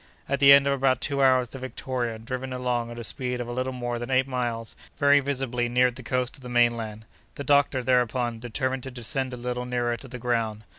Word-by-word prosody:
At 140 0 -1
the 140 0 +8
end 140 0 +8
of 140 - +2
about 130 -2 +2
two 140 0 -1
hours 130 -2 +4
the 135 - -9
Victoria, 125 -2 -3
driven 130 +3 -5
along 125 -2 -1
at 120 - -8
a 120 - -5
speed 125 +1 -3
of 120 - -4
a - - -5
little 130 +2 -2
more 120 -2 -3
than 120 +1 -5
eight 130 0 +2
miles, 120 -3 -3 0.2
very 145 0 +5
visibly 130 -3 -1
neared 125 0 +3
the - - -8
coast 125 +1 -2
of - - -17
the 125 - -8
mainland. 115 -3 +1 0.3
The 140 - -5
doctor, 140 -2 +3
thereupon, 120 -2 +1
determined 130 +3 -2
to 130 - -7
descend 130 +2 -3
a 125 - -6
little 125 0 -3
nearer 120 -1 -1
to 135 - -11
the 125 0 -7
ground. 115 -3 -1
125 Hz, 230 wpm, -26 LUFS, 120-130 Hz, 0.3 s, the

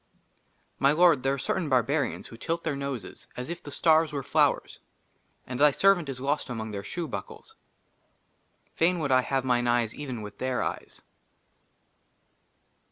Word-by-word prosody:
MY 140 +1 +4
LORD, 165 -4 +5
THERE 135 +1 +1
ARE - - -7
CERTAIN 160 +5 -2
BARBARIANS 135 +2 +1
WHO 115 - -11
TILT 165 +7 -3
THEIR 155 -3 -1
NOSES 140 -4 -6
AS 125 +6 -4
IF 170 - -6
THE - - -9
STARS 160 +2 +3
WERE 140 -2 -3
FLOWERS, - - +1 0.7
AND 125 0 -5
THY 150 +1 +7
SERVANT 175 0 +3
IS 130 -2 -4
LOST 140 +1 -1
AMONG 110 -3 -4
THEIR 100 -1 -5
SHOE 170 - -4
BUCKLES. 100 -8 -8 1.2
FAIN 175 +2 +2
WOULD 145 -5 -1
I 130 0 +5
HAVE 135 0 -1
MINE 120 -1 +1
EYES 120 -2 +1
EVEN 130 -7 -6
WITH 105 -1 -10
THEIR 130 -1 -1
EYES. - - -6
135 Hz, 165 wpm, -27 LUFS, 125-155 Hz, 1.2 s, THY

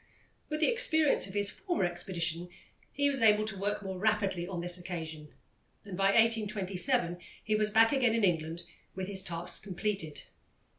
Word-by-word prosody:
With 305 0 -3
the - - +4
experience 320 - +3
of 190 - -9
his 205 0 +1
former 350 - -2
expedition, 175 -1 -2 0.4
he 285 +1 +1
was 275 -3 +1
able 215 -1 +5
to 215 -2 -3
work 205 +2 -2
more 190 -1 -5
rapidly 200 -4 0
on 185 -2 -4
this 175 +1 -1
occasion, 160 -4 -6 0.5
and 200 -3 -7
by 195 +1 0
1827 205 -2 +2 0.2
he 215 - -1
was 215 0 +2
back 225 +2 +5
again 250 -5 +2
in 230 - 0
England 165 -2 0 0.3
with 190 0 -3
his 195 -1 +3
task 175 -1 -3
completed. 190 -5 -3
195 Hz, 165 wpm, -31 LUFS, 175-220 Hz, 0.5 s, able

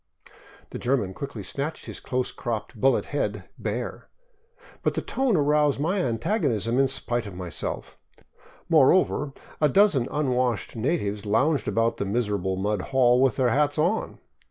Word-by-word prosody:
" - - -23
The - - -6
German 120 -7 0
quickly 130 -3 -6
snatched 140 - -4
his - - -7
close 125 0 -2
cropped 115 0 -4
bullet 130 +3 +2
head 105 -9 -3
bare, 115 +3 -4 0.7
but - - 0
the - - 0
tone 260 -7 +1
aroused 150 -1 +2
my 180 +7 0
antagonism 120 - 0
in 135 - +4
spite 120 -4 -2
of 100 - -9
myself; 90 -2 -5 0.7
more 155 -6 +6
over, 150 -5 +1 0.3
a 150 - +5
dozen 165 - +4
unwashed 125 -6 0
natives 105 -5 -1
lounged 140 +8 +2
about 115 0 +1
the 100 - -2
miserable 100 -3 -1
mud 100 +1 -1
hall 125 +1 +3
with 135 -1 +3
their 130 -2 +2
hats 145 +4 +2
on. 175 +8 0
125 Hz, 155 wpm, -25 LUFS, 110-145 Hz, 0.7 s, more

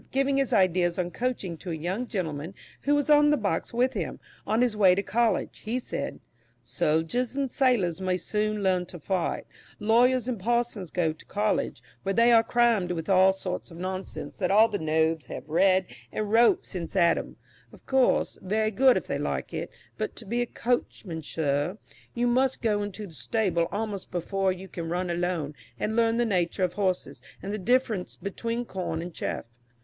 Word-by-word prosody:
Giving 275 +1 +1
his 275 -2 +1
ideas 185 -5 +3
on 175 -1 -1
coaching 230 -9 -2
to 180 - -8
a 165 - -2
young 185 +10 -3
gentleman 165 - -4 0.3
who 290 +1 +2
was 290 -1 +1
on 295 0 +6
the 295 - +4
box 200 -7 -1
with 250 +2 +1
him, - - -4 0.3
on 220 +3 +2
his 240 -4 +1
way 190 -3 +6
to 200 - -1
college, 230 +1 0
he 225 +3 -2
said: 255 - -4 0.4
"Soldiers 165 - 0
and 275 -2 -1
sailors 205 - +2
may 185 -1 +1
soon 210 +1 -1
learn 185 -2 +1
to 175 - -9
fight; 180 +2 -2 0.3
lawyers 245 +3 +3
and 245 -5 -2
parsons 235 -3 -1
go 165 -2 0
to 155 - -18
college, 210 +1 -1 0.2
where 195 0 -1
they 235 +2 +5
are 230 -1 +7
crammed 225 -6 +2
with 165 0 -5
all 190 0 +6
sorts 190 -1 -5
of 165 - -11
nonsense 185 +1 -5
that 185 - 0
all 215 +3 +6
the 210 -2 -3
Nobs 160 -2 +1
have - - -7
read 185 +4 +3 0.3
and 210 -1 -3
wrote 230 +1 +5
since 175 -2 -6
Adam 170 -3 +2 0.3
of - - -17
course, 265 -2 +2
very 215 +3 0
good 255 +4 +5
if - - -3
they - - -2
like - - -3
it - - -3 0.3
but - - -3
to 230 - -9
be 235 +4 -1
a 240 - -1
coachman, 215 -9 -2
sir, 145 +4 -1 0.4
you 240 0 +1
must 255 +2 +2
go 210 -2 +2
into 205 +1 -5
the 175 - -12
stable 175 -3 0
almost 205 -2 -3
before 190 +2 0
you 185 +1 -7
can 170 -2 -6
run 175 +1 -1
alone, 170 -4 -1 0.3
and 220 - -1
learn 230 0 +3
the 240 - +2
nature 185 -3 0
of 180 -1 +1
horses 180 -10 -1 0.2
and 200 - -4
the 215 - -2
difference 220 -2 +1
between 230 +4 -3
corn 180 -6 -3
and 170 +1 -6
chaff. - - -3
195 Hz, 190 wpm, -27 LUFS, 175-235 Hz, 0.4 s, are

